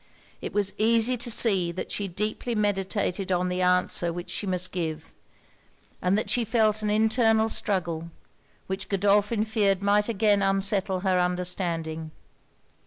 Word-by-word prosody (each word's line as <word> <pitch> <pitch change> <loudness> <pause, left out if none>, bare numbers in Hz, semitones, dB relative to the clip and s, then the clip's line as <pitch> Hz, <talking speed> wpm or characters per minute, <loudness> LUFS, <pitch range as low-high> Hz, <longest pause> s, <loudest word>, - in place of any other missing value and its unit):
It - - -5
was 205 -1 0
easy 230 +3 +3
to 240 +1 -3
see 195 -7 +3
that 185 - -6
she 200 - -2
deeply 210 +5 -3
meditated 195 -2 -1
on 180 0 0
the 180 0 -2
answer 180 -1 +2
which 175 +1 -7
she 205 - -4
must 185 -1 -1
give; 160 -3 -5 0.9
and 185 +3 +1
that 215 - -2
she 245 - +1
felt 215 -1 +1
an 210 - -1
internal 220 +1 +2
struggle, 170 -6 -2 0.6
which 190 0 -5
Godolphin 205 +2 +2
feared 200 -4 +1
might 205 +2 +2
again 205 -2 +2
unsettle 195 -1 +1
her 185 -2 +1
understanding. 175 -3 -2
195 Hz, 145 wpm, -26 LUFS, 180-215 Hz, 0.9 s, easy